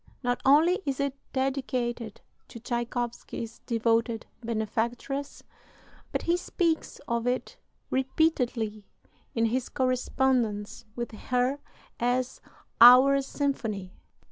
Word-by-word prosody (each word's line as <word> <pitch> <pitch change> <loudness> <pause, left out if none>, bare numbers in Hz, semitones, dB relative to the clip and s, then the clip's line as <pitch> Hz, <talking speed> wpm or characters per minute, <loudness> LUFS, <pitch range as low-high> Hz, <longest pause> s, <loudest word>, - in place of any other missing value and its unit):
Not 245 0 0
only 315 +7 +5
is 275 -2 -2
it 280 -1 0 0.2
dedicated 255 -4 -2 0.3
to 235 - -10
Tschaikowsky's 240 -1 -4
devoted 230 0 +1 0.2
benefactress, 235 +5 -3 0.7
but - - -2
he 340 - +2
speaks 340 -2 -1
of 235 0 -1
it 255 - -2 0.3
repeatedly 250 -6 0 0.5
in 230 -1 +2
his 245 +2 -1
correspondence 245 -4 0
with 240 -1 -4
her 250 +5 -1 0.4
as 245 +1 0 0.4
"our" 260 +3 +9
symphony. 225 -9 -3
245 Hz, 95 wpm, -28 LUFS, 230-270 Hz, 0.7 s, our